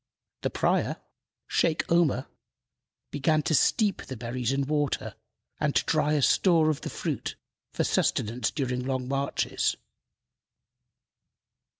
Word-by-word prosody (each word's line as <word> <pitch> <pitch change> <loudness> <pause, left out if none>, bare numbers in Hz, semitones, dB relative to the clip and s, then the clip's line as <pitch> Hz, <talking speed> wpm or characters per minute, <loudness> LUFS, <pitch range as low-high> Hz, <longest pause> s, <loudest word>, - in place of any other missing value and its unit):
The - - 0
prior, - - 0 0.5
Sheykh 160 0 0
Omer, 160 -6 +3 0.9
began 150 +2 +1
to 160 - 0
steep 205 - +3
the 130 - -7
berries 120 +1 -2
in 135 0 0
water 145 -1 -1 0.5
and 150 -2 0
to - - +3
dry 150 -1 +2
a 145 -2 +2
store 165 -2 +4
of 150 - -5
the - - -4
fruit - - -3 0.4
for - - -1
sustenance 115 +1 0
during 125 -3 -2
long 130 -1 -2
marches. 140 +1 0
140 Hz, 120 wpm, -27 LUFS, 130-155 Hz, 0.9 s, store